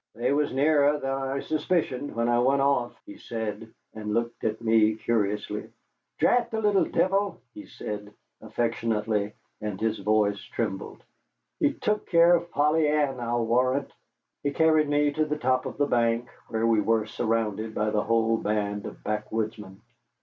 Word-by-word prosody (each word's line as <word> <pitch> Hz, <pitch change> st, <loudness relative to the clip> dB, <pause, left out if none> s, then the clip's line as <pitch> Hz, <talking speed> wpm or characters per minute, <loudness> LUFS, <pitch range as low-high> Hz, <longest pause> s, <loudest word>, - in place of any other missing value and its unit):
"They 120 Hz, +4 st, 0 dB
was 145 Hz, 0 st, +1 dB
nearer 145 Hz, +1 st, +3 dB
than 135 Hz, -2 st, -3 dB
I 135 Hz, 0 st, -2 dB
suspicioned 155 Hz, -4 st, -1 dB
when 115 Hz, 0 st, 0 dB
I 120 Hz, 0 st, +3 dB
went 135 Hz, +3 st, +3 dB
off," 135 Hz, -4 st, 0 dB
he 305 Hz, -1 st, -11 dB
said, 110 Hz, -, -5 dB, 0.2 s
and 105 Hz, -1 st, -4 dB
looked 115 Hz, 0 st, -2 dB
at 110 Hz, 0 st, -1 dB
me 110 Hz, -1 st, +3 dB
curiously. 105 Hz, -2 st, -2 dB, 0.5 s
"Drat 245 Hz, -1 st, +3 dB
the 220 Hz, -, -2 dB
little 205 Hz, -2 st, +3 dB
deevil," 195 Hz, +2 st, +1 dB, 0.2 s
he 310 Hz, -2 st, -10 dB
said 105 Hz, -1 st, -7 dB, 0.3 s
affectionately, 110 Hz, -3 st, -1 dB, 0.3 s
and 105 Hz, -3 st, -4 dB
his 110 Hz, 0 st, -1 dB
voice 105 Hz, 0 st, +1 dB
trembled, 100 Hz, -5 st, -4 dB, 0.6 s
"he -, -, +3 dB
took 210 Hz, 0 st, -1 dB
care 170 Hz, 0 st, +6 dB
of 170 Hz, 0 st, -3 dB
Polly 150 Hz, 0 st, +2 dB
Ann, 145 Hz, -3 st, +1 dB
I'll 120 Hz, 0 st, -1 dB
warrant." 130 Hz, +4 st, +1 dB, 0.5 s
He 145 Hz, -, 0 dB
carried 155 Hz, 0 st, +3 dB
me 145 Hz, 0 st, +2 dB
to 155 Hz, +2 st, 0 dB
the 150 Hz, 0 st, -2 dB
top 130 Hz, -2 st, +1 dB
of -, -, -7 dB
the 145 Hz, -, +2 dB
bank, 120 Hz, -2 st, +1 dB, 0.2 s
where 115 Hz, 0 st, -1 dB
we 115 Hz, -2 st, +3 dB
were 110 Hz, 0 st, +1 dB
surrounded 110 Hz, -1 st, -2 dB
by 105 Hz, 0 st, 0 dB
the 105 Hz, -, +1 dB
whole 115 Hz, 0 st, +2 dB
band 105 Hz, -1 st, -2 dB
of -, -, -11 dB
backwoodsmen. 105 Hz, -2 st, -4 dB
120 Hz, 165 wpm, -26 LUFS, 110-145 Hz, 0.6 s, care